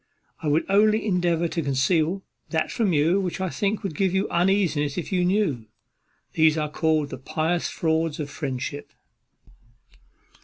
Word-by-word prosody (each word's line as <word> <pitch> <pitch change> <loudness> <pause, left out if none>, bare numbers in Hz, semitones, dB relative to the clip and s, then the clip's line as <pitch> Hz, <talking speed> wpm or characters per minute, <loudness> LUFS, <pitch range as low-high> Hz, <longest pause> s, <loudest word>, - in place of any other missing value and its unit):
I 160 - -3
would 150 +2 +2
only 215 +2 +3
endeavour 175 -4 +1
to 165 - -2
conceal 160 +6 +1 0.3
that 160 -1 -1
from 215 -5 +1
you 165 +5 +3
which 185 -1 -3
I 185 -2 -2
think 205 +1 -1
would 195 -5 -3
give 190 +1 +1
you 190 +2 +1
uneasiness 170 -5 +1
if 175 - -4
you 180 -2 +2
knew. 175 - 0 0.7
These 160 -1 +4
are 150 -1 -2
called 155 -2 0
the 130 - -6
pious 160 +5 -1
frauds 160 -1 -1
of 150 - -3
friendship." 145 -1 -5
165 Hz, 155 wpm, -24 LUFS, 150-190 Hz, 0.7 s, These